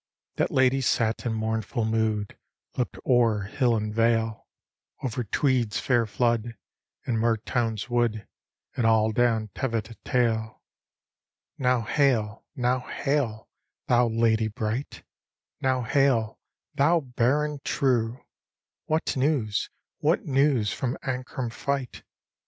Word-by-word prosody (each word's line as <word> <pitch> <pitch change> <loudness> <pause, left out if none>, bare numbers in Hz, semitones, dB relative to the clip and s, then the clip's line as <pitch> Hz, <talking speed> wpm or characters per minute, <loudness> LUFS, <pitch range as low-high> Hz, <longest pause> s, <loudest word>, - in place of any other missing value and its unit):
That - - +1
lady 130 +1 +3
sat 115 -1 0
in 115 - 0
mournful 110 0 -1
mood; 110 -2 0 0.4
Look'd 125 - -2
o'er 115 -5 +3
hill 120 +3 +1
and 105 -1 -2
vale; 115 -1 +1 0.6
Over 125 -1 -2
Tweed's 120 0 +1
fair 120 -3 +2
flood, 115 0 0 0.5
and 115 -3 0
Mertoun's 115 -1 0
wood. 120 -4 0 0.5
And 120 -3 +2
all 110 -1 +4
down 110 -1 +1
Teviotdale. 115 -1 -1 0.5
" - - -64
Now 125 -2 +2
hail, 115 -3 +1
now 125 -1 +1
hail, 135 -7 -1 0.4
thou 120 0 +3
lady 115 -1 +2
brightl 110 +5 -4
"^ - - -37 0.3
" - - -52
Now 130 -1 +1
hail, 120 -3 +1 0.3
thou 165 +4 +3
Baron, 140 +3 0
truci 125 -3 0 0.7
What 155 +1 0
news, 130 -6 0 0.3
what - - +1
news 135 -5 +2
from 130 -1 -2
Ancram 130 -2 -3
fight? 140 -1 -3
120 Hz, 115 wpm, -26 LUFS, 110-130 Hz, 0.7 s, all